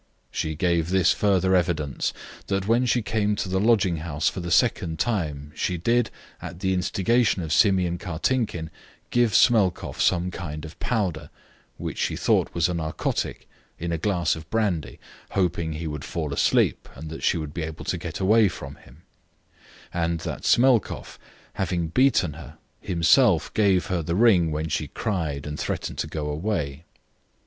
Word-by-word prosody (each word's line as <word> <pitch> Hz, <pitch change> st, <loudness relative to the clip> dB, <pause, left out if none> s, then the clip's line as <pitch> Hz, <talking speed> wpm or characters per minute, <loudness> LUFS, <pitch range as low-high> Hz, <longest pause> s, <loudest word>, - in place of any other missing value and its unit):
She 80 Hz, 0 st, -2 dB
gave 85 Hz, 0 st, +1 dB
this 95 Hz, -2 st, +4 dB
further 95 Hz, -2 st, +2 dB
evidence 80 Hz, -6 st, 0 dB, 0.4 s
that 100 Hz, -1 st, -1 dB
when 120 Hz, +3 st, +3 dB
she 120 Hz, -1 st, +2 dB
came 105 Hz, -1 st, 0 dB
to 100 Hz, -, -3 dB
the 95 Hz, +1 st, 0 dB
lodging 100 Hz, -5 st, +3 dB
house 75 Hz, -2 st, -2 dB
for -, -, -1 dB
the 85 Hz, -1 st, -4 dB
second 80 Hz, -1 st, +2 dB
time 75 Hz, -9 st, -2 dB
she 90 Hz, +2 st, -1 dB
did, 115 Hz, +7 st, +1 dB, 0.3 s
at 85 Hz, -, -8 dB
the 95 Hz, 0 st, 0 dB
instigation 100 Hz, +3 st, +1 dB
of 80 Hz, -1 st, -2 dB
Simeon 90 Hz, -4 st, +3 dB
Kartinkin, 90 Hz, -1 st, -2 dB, 0.4 s
give 120 Hz, -2 st, +2 dB
Smelkoff 105 Hz, -8 st, +3 dB
some 90 Hz, 0 st, +2 dB
kind 80 Hz, -4 st, -6 dB
of 80 Hz, -, -11 dB
powder, 95 Hz, -, -1 dB, 0.5 s
which -, -, -5 dB
she -, -, 0 dB
thought -, -, +1 dB
was 85 Hz, -1 st, +3 dB
a 90 Hz, -, -2 dB
narcotic, 80 Hz, -2 st, -3 dB, 0.3 s
in 85 Hz, +1 st, -4 dB
a 85 Hz, -, -1 dB
glass 85 Hz, -3 st, +1 dB
of 80 Hz, 0 st, -10 dB
brandy, 90 Hz, -, -1 dB, 0.3 s
hoping 85 Hz, -4 st, 0 dB
he 80 Hz, +2 st, -5 dB
would 75 Hz, -2 st, -5 dB
fall 75 Hz, -4 st, -3 dB
asleep -, -, +2 dB
and 80 Hz, +4 st, -8 dB
that 80 Hz, -, -7 dB
she 85 Hz, -, +2 dB
would 75 Hz, -2 st, -5 dB
be 85 Hz, -, -4 dB
able 80 Hz, 0 st, -6 dB
to -, -, -1 dB
get -, -, -6 dB
away 110 Hz, +3 st, +5 dB
from 70 Hz, -5 st, -7 dB
him; 75 Hz, +3 st, -19 dB, 0.9 s
and 85 Hz, -1 st, -1 dB
that -, -, -5 dB
Smelkoff, 125 Hz, -3 st, +2 dB, 0.3 s
having 85 Hz, -3 st, -1 dB
beaten 95 Hz, -, +3 dB
her, 75 Hz, -3 st, -11 dB, 0.2 s
himself 85 Hz, -3 st, +3 dB
gave 95 Hz, -5 st, +3 dB
her 90 Hz, -2 st, -1 dB
the 85 Hz, +2 st, -2 dB
ring 95 Hz, -6 st, +4 dB
when 75 Hz, +1 st, -2 dB
she 75 Hz, -1 st, -2 dB
cried 80 Hz, -7 st, -3 dB
and 75 Hz, 0 st, -5 dB
threatened -, -, -3 dB
to -, -, -1 dB
go 75 Hz, -2 st, -4 dB
away. 75 Hz, -2 st, -3 dB
85 Hz, 170 wpm, -25 LUFS, 80-100 Hz, 0.9 s, away